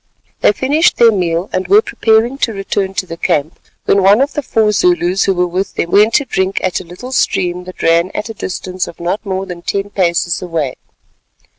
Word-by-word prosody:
They - - +4
finished 285 - +1
their 235 -1 +6
meal, 175 -2 -1
and 185 0 -1
were 205 +4 +5
preparing 230 +4 +1
to 230 - 0
return 195 -1 -3
to 185 - -1
the 165 -2 -8
camp, 155 0 -1 0.3
when 200 - +3
one 200 +3 +5
of 275 +2 +1
the 295 - -2
four 220 -5 +1
Zulus 205 - +2
who 195 - +2
were 180 0 +1
with 185 +3 -3
them 170 - -2
went 210 +3 +4
to 290 - +2
drink 190 -5 -1
at 185 - 0
a - - -8
little 180 +9 -10
stream 180 -7 0
that 185 - -9
ran 170 +2 +3
at 210 - -3
a 225 - -6
distance 185 -2 -4
of - - -11
not 175 +5 -2
more 190 -2 -3
than 180 -2 -8
ten 200 +3 -3
paces 175 -2 0
away. 165 -7 -2
190 Hz, 210 wpm, -15 LUFS, 175-220 Hz, 0.3 s, their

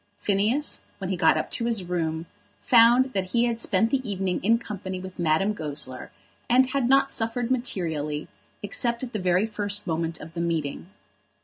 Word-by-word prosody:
Phineas, 215 +9 0 0.2
when 190 -1 -4
he - - 0
got 170 -2 +4
up - - -3
to 230 - -2
his 230 -5 0
room, 165 -2 -2 0.4
found 245 +2 +5
that 190 -1 0
he 235 0 +3
had 235 -1 -1
spent 225 +1 +2
the 275 - +1
evening 190 -2 -2
in 225 +4 +4
company 190 -4 -6
with 185 0 -9
Madame 170 +5 +2
Goesler, 145 -7 -4 0.4
and 255 +2 +4
had 265 -3 0
not 275 0 +4
suffered 230 +2 -1
materially, 160 - -2 0.4
except 235 +4 0
at 250 - -6
the 215 - -2
very 180 +2 +2
first 205 -1 -1
moment 165 -1 -2
of 160 +2 -10
the 170 - -3
meeting. 165 -2 -2
200 Hz, 180 wpm, -25 LUFS, 170-235 Hz, 0.4 s, found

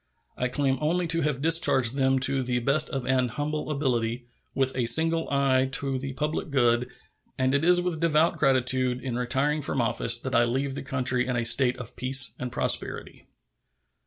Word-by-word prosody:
I 125 - -2
claim 135 0 -1
only 170 +4 0
to 165 0 +1
have 150 -3 -2
discharged 145 -7 +3
them 135 -1 +1
to 135 0 +2
the 125 -1 -2
best 140 +6 0
of 135 -2 -4
an 130 -1 +1
humble 150 +5 -4
ability, 125 -5 -2 0.3
with 135 -1 -1
a 125 -2 -1
single 165 +4 +3
eye 135 -2 +1
to 135 -2 0
the 135 0 -6
public 150 +3 -3
good, 120 -3 +1 0.5
and 130 0 0
it 140 +2 +1
is 175 +1 +4
with 175 -3 -3
devout 165 0 +1
gratitude 130 -2 +1
in 130 -3 -4
retiring 135 +5 -1
from 135 - -3
office 115 0 +1
that 130 - -6
I 120 0 +4
leave 135 +3 -2
the 140 - -6
country 125 -2 -2
in 125 - -2
a 120 -1 -1
state 125 +1 +3
of 120 -2 -9
peace 130 -3 +3
and 125 -1 -5
prosperity. - - -2
135 Hz, 190 wpm, -25 LUFS, 125-145 Hz, 0.5 s, is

